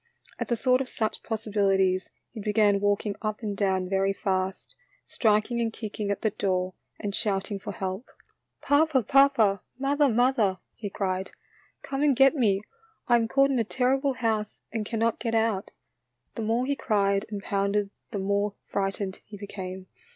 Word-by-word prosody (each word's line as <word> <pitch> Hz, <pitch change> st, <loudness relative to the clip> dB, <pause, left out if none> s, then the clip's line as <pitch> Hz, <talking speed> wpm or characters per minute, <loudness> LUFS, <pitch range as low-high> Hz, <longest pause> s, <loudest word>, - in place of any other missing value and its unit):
At -, -, -2 dB
the 240 Hz, -, +1 dB
thought 255 Hz, +2 st, +3 dB
of 265 Hz, -, -4 dB
such 220 Hz, -1 st, -2 dB
possibilities 195 Hz, -4 st, +1 dB, 0.2 s
he 220 Hz, -, -7 dB
began 210 Hz, -1 st, +3 dB
walking 205 Hz, 0 st, 0 dB
up 215 Hz, +1 st, -3 dB
and 205 Hz, -2 st, -2 dB
down 190 Hz, -2 st, +1 dB
very 195 Hz, +1 st, +1 dB
fast, 190 Hz, -1 st, -2 dB, 0.3 s
strik 215 Hz, 0 st, +2 dB
ing 235 Hz, 0 st, 0 dB
and 225 Hz, -1 st, 0 dB
kicking 215 Hz, -2 st, -5 dB
at 200 Hz, -, -2 dB
the 220 Hz, -, +2 dB
door 185 Hz, -3 st, -1 dB, 0.3 s
and 205 Hz, -1 st, -3 dB
shouting 200 Hz, -1 st, -1 dB
for -, -, -6 dB
help. 190 Hz, +5 st, -4 dB, 0.6 s
"Papa, 285 Hz, -3 st, +3 dB
papa; 260 Hz, -7 st, +4 dB, 0.2 s
mother, 280 Hz, +2 st, +2 dB
mother," 235 Hz, -5 st, +2 dB, 0.2 s
he 210 Hz, -2 st, -6 dB
cried, 190 Hz, -1 st, -2 dB, 0.3 s
" -, -, -35 dB
come 270 Hz, 0 st, -3 dB
and 290 Hz, -2 st, +4 dB
get 270 Hz, +4 st, +6 dB
me, 210 Hz, -7 st, +2 dB, 0.4 s
I 240 Hz, -, +5 dB
am 230 Hz, -1 st, +2 dB
caught 275 Hz, +3 st, +3 dB
in 260 Hz, -, +1 dB
a -, -, +3 dB
terrible 265 Hz, +4 st, +1 dB
house 220 Hz, -4 st, -2 dB
and 220 Hz, -2 st, -2 dB
cannot 230 Hz, 0 st, 0 dB
get 230 Hz, -1 st, -1 dB
out." 220 Hz, -3 st, +1 dB, 0.6 s
The 230 Hz, -, -5 dB
more 225 Hz, +3 st, +1 dB
he 280 Hz, +1 st, 0 dB
cried 200 Hz, -4 st, +1 dB
and 205 Hz, -2 st, -4 dB
pounded 200 Hz, 0 st, 0 dB, 0.2 s
the 210 Hz, -, -4 dB
more 200 Hz, +1 st, 0 dB
frightened 195 Hz, 0 st, -2 dB
he 210 Hz, -, -9 dB
became. 190 Hz, -2 st, -7 dB
210 Hz, 175 wpm, -27 LUFS, 195-240 Hz, 0.6 s, get